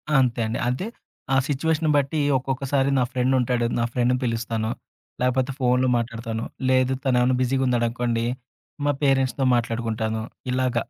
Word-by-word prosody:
అంతే 125 -3 +3
అండి. 110 - -3
అంతే. 125 +10 -1 0.5
ఆ - - +5
సిట్యుయేషన్‌ని 155 +2 +1
బట్టి 145 +2 0 0.2
ఒక్కొక్కసారి 135 +1 0
నా - - +3
ఫ్రెండ్ 130 +1 +1
ఉంటాడు. 125 -1 +1
నా - - +2
ఫ్రెండ్‌‌ని 125 0 +2
పిలుస్తాను, 115 -1 -1 0.5
లాపోతే 125 +1 +1
ఫోనులు 125 0 +2
మాట్లాడతాను. 115 -1 -3 0.3
లేదు 130 0 +3
తనేమన్నా 125 -1 +3
బిజీగున్నాడనుకోండి, 120 -2 0 0.6
మా 145 - +4
పేరెంట్స్‌తో 135 -1 +2
మాట్లాడుకుంటాను. 115 -2 -1 0.3
ఇలాగ. 130 -1 0
125 Hz, 125 wpm, -24 LUFS, 115-130 Hz, 0.6 s, ఆ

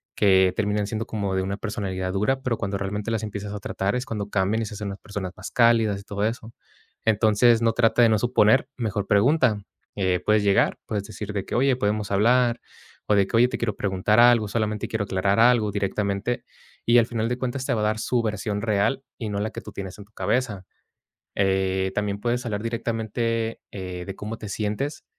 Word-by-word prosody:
que 95 -2 +4
terminan 105 -1 0
siendo 110 +1 -3
como 100 -3 -2
de 95 - 0
una 100 +1 -2
personalidad 95 -4 -3
dura, 120 +7 0
pero 125 -4 -1
cuando 100 0 -2
realmente 100 +2 -3
las 110 -1 -1
empiezas 105 -1 -5
a 105 - -5
tratar, 100 +1 -2
es 125 +1 -2
cuando 105 -2 -4
cambian 100 +3 +1
y - - -3
se 105 - -7
hacen 105 0 -4
las 100 - -7
personas 100 -3 -5
más - - -7
cálidas 115 -5 +3
y - - -15
todo 100 +1 -2
eso. 115 0 -4 0.5
Entonces, 110 +2 +4
no, 115 -1 +3
trata 115 +1 +3
de 115 - +6
no 110 -1 +3
suponer, 120 +1 +3
mejor 105 -4 -2
pregunta, 110 +1 +3 0.3
eh, 95 -3 0
puedes 105 -1 +3
llegar, 100 -1 +3
puedes 105 -2 -2
decir 105 -1 -7
de 100 -2 -3
que: - - -4
"Oye, 130 +1 +3
¿podemos 105 -2 -1
hablar?", 120 +4 +3 0.5
o 105 - +3
de 100 -1 +3
que: - - -3
"Oye, 120 - +6
te - - -3
quiero 110 -3 -1
preguntar 100 +3 +1
algo, 120 -2 +6
solamente 110 -1 -1
quiero 110 -2 -1
aclarar 100 +2 +1
algo", 115 -3 +4
directamente 100 +3 -2 0.4
y, 120 +1 +5
al 115 - +3
final 115 -2 -1
de 125 - -1
cuentas, 130 +1 -3
te - - 0
va 110 - 0
a - - +1
dar 110 +1 0
su 125 +1 0
versión 105 -1 -2
real 110 +5 +1
y 110 -3 -4
no 100 -1 -2
la 110 +2 -1
que - - -7
tú 105 - -10
tienes 95 -2 -7
en 100 - -10
tu 110 - -33
cabeza, 105 0 -1 0.7
eh, 95 -1 +1
también 100 -1 -1
puedes 120 +1 -1
hablar 105 -3 -2
directamente, 115 0 -2
eh, 90 -2 -6
de 95 - -6
cómo 110 +3 -6
te 105 - -8
sientes, 110 +9 -3
105 Hz, 215 wpm, -24 LUFS, 100-115 Hz, 0.7 s, de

